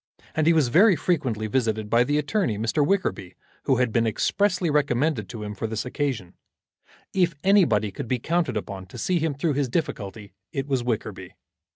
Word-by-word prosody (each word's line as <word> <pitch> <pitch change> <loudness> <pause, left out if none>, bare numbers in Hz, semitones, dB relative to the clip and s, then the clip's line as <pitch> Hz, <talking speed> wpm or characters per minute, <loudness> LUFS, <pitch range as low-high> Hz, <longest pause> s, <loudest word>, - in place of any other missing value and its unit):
And 155 0 +1
he 170 - +6
was 155 -6 +3
very 185 - +6
frequently 130 - -1
visited 110 -2 0
by 115 +3 +4
the 145 +4 0
attorney, 150 - 0
Mr. 115 +8 +1
Wickerby, 140 - -1 0.3
who 135 - +3
had 125 -2 +1
been 115 -1 +2
expressly 180 - +1
recommended 145 -5 +1
to 110 -3 -6
him 105 0 -5
for 105 +3 -4
this 110 +1 -3
occasion. 125 -9 -3 0.8
If 180 -4 +2
anybody 145 - +4
could 110 - -6
be 125 - 0
counted 165 0 0
upon 95 -2 -6
to 110 - -11
see 175 +9 0
him 155 -2 -1
through 150 +2 0
his 140 -2 0
difficulty 105 - -4 0.2
it 135 -1 -2
was 135 -3 0
Wickerby. 105 -5 -4
125 Hz, 185 wpm, -25 LUFS, 110-160 Hz, 0.8 s, he